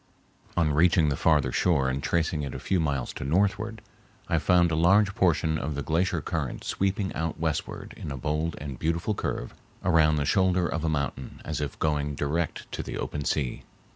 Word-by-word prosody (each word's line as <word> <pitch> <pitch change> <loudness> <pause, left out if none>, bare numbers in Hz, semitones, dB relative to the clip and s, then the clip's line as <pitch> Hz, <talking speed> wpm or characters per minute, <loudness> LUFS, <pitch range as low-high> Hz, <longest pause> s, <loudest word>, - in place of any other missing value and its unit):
On 80 -4 +3
reaching 80 0 +4
the 70 - 0
farther 75 0 +3
shore 75 -7 +2
and 65 +1 -1
tracing 80 -1 0
it 70 -3 -5
a - - -4
few 95 - 0
miles 70 -6 -1
to - - -6
northward, 100 +8 0 0.4
I - - +2
found 85 -1 +4
a - - +1
large 95 +5 +4
portion 80 -4 +2
of 75 0 -3
the 70 - -3
glacier 85 +2 +1
current 80 -4 -3
sweeping 100 0 -1
out 80 0 -3
westward 80 -2 -3
in - - -6
a 70 - -4
bold 75 +5 -1
and 70 -4 -6
beautiful 85 +6 0
curve - - -3 0.3
around 80 -3 +4
the 75 -1 0
shoulder 95 0 +3
of 80 -1 -3
a 80 - +1
mountain 70 -3 -3
as 80 -1 -3
if 75 - -4
going 75 -2 0
direct 80 +4 -2
to - - -3
the - - -5
open 75 -2 -3
sea. 65 -5 -1
80 Hz, 195 wpm, -27 LUFS, 75-90 Hz, 0.4 s, reaching